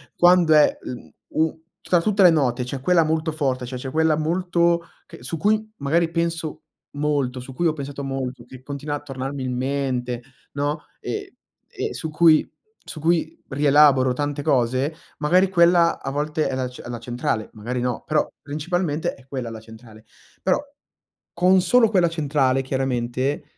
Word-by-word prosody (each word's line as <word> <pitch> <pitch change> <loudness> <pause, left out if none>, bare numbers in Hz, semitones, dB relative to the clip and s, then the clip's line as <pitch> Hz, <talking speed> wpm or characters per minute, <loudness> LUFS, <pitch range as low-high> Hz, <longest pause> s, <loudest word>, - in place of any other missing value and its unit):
quando 175 -2 +5
è, 150 -1 +5
mhmm, 125 - -8 0.2
u 160 0 -1 0.2
tra 175 -2 +2
tutte 205 +2 +2
le 180 - +9
note 130 -6 +1
c'è 135 +2 -5
quella 175 +2 +4
molto 160 +1 0
forte, 135 -5 -1
cioè 125 +1 -6
c'è 130 +1 -6
quella 160 +1 +3
molto 170 +1 +1 0.2
che - - -13
su 165 - -3
cui 215 +4 +1
magari 165 +4 +1
penso 165 -2 -2 0.3
molto, 145 -3 -1
su 130 +1 -9
cui 170 +5 +1
ho 155 - +1
pensato 140 -1 -6
molto, 130 -2 -4
che 130 0 -13
continua 145 +1 -4
a - - -6
tornarmi 135 -1 -5
in 125 -1 -2
mente, 125 -2 -2 0.3
no, 145 +2 -2 0.2
ehm 420 -1 -4 0.4
ehm, - - -3
su 160 - -5
cui 155 0 +4 0.4
su 155 - -7
cui 160 0 0
rielaboro 140 -2 +4
tante 145 +2 -2
cose, 135 +1 +1 0.2
magari 180 +5 +3
quella 170 -2 +4
a 135 - -4
volte 150 +2 -1
è 130 - -2
la 130 -1 -1
c 125 - -11
è - - -10
la 120 - -4
centrale, 120 -2 -2
magari 120 +3 -4
no, 125 -2 -2
però 155 -1 +1
principalmente 155 +2 -2
è 135 - -18
quella 130 -3 -4
la 110 - -7
centrale. 110 0 -15 0.4
Però, 185 +6 +2 0.7
con 185 +2 +4
solo 225 +5 +4
quella 180 -5 +3
centrale, 140 -5 +1
chiaramente, 130 0 -1
145 Hz, 170 wpm, -23 LUFS, 130-165 Hz, 0.7 s, le